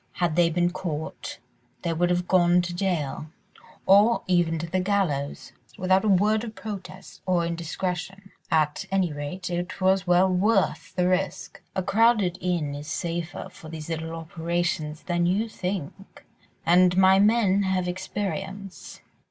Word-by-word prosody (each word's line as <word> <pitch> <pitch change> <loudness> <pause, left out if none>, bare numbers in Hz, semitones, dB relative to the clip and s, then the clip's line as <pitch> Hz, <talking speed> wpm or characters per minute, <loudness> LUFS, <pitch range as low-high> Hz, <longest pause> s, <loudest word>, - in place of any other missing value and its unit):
Had 175 -3 0
they 170 -1 +4
been 175 +1 +1
caught 170 -4 -5 0.5
they 170 - 0
would 175 +2 +1
have 180 0 0
gone 175 -1 +4
to 175 0 -4
jail, 175 -6 -2 0.6
or 205 +5 +5
even 175 -3 +2
to 160 - -3
the 185 +3 -1
gallows, 180 -8 -1 0.3
without 185 +2 +2
a - - 0
word 210 +3 +3
of 220 -2 -7
protest 195 -3 -8
or 175 -2 +2
indiscretion; 180 +3 -4 0.2
at 155 -2 +1
any 190 -5 +1
rate 175 +6 -5
it 175 +2 -3
was 190 0 +2
well 180 +2 +5
worth 190 +2 +1
the 180 -1 +2
risk. 185 +1 -2
A 190 - 0
crowded 205 -3 +3
inn 170 -5 -1
is 145 +1 -7
safer 170 0 -4
for 155 - -12
these 160 0 -7
little 165 0 -4
operations 165 -1 -3
than 175 -2 0
you 205 +6 +1
think, 190 -2 -6 0.4
and 180 +1 +5
my 190 0 +6
men 205 -2 +4
have 190 -2 0
experience." 190 +1 -5
180 Hz, 150 wpm, -25 LUFS, 170-190 Hz, 0.6 s, my